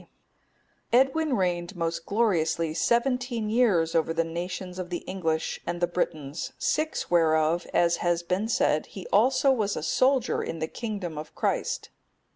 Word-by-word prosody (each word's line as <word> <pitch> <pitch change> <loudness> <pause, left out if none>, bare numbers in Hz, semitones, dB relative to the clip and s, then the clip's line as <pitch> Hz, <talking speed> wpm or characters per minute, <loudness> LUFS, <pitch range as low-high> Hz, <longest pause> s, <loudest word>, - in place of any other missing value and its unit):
D.] - - -21 0.9
Edwin 270 +2 +2
reigned 175 0 -1
most 165 -1 -3
gloriously 170 -7 +1
seventeen 235 +3 0
years 200 -9 +3
over 165 0 +1
the 165 - +2
nations 180 +2 -5
of 180 -1 -5
the 175 - -4
English 165 -4 -2
and 175 - -3
the 175 - +3
Britons, 155 -4 -3
six 310 - -1
whereof, 160 0 +3
as 170 0 +3
has 175 -1 0
been 185 +5 -1
said, 155 -8 +1
he 190 - -9
also 260 +6 +4
was 215 -6 0
a - - -4
soldier 255 - +2
in 165 - -4
the 160 - -2
kingdom 195 -7 -5
of 155 - -9
Christ. - - -1
175 Hz, 155 wpm, -27 LUFS, 165-225 Hz, 0.9 s, also